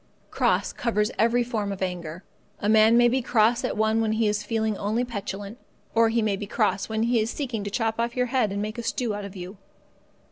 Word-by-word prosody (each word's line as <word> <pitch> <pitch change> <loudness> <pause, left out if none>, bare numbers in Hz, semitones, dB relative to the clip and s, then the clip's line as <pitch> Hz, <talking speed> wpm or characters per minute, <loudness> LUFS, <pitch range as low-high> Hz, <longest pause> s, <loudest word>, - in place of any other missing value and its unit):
Cross - - +1
covers 210 -3 0
every 235 +2 +3
form 220 -4 -2
of 195 -1 -4
anger. 175 -1 -5 0.4
A 205 - -2
man 220 +2 +6
may 240 0 +6
be 260 +2 +1
cross 230 0 +2
at - - -2
one 220 +1 +2
when 220 -1 +1
he 220 0 +1
is 210 0 0
feeling 220 0 -1
only 220 +5 -1
petulant; 205 -1 -6 0.3
or 230 0 +4
he 230 0 +1
may 210 -2 +1
be 200 +1 -6
cross 210 -2 0
when 220 0 0
he 235 0 +2
is 220 +1 0
seeking 245 -6 -3
to 205 - -3
chop 225 +1 -1
off 235 0 -1
your 250 -1 +1
head 235 -6 +2
and 200 +1 -2
make 215 +2 -5
a - - -2
stew 235 -1 -2
out 205 0 -5
of 200 0 -9
you. 185 +2 -8
220 Hz, 235 wpm, -25 LUFS, 205-235 Hz, 0.4 s, man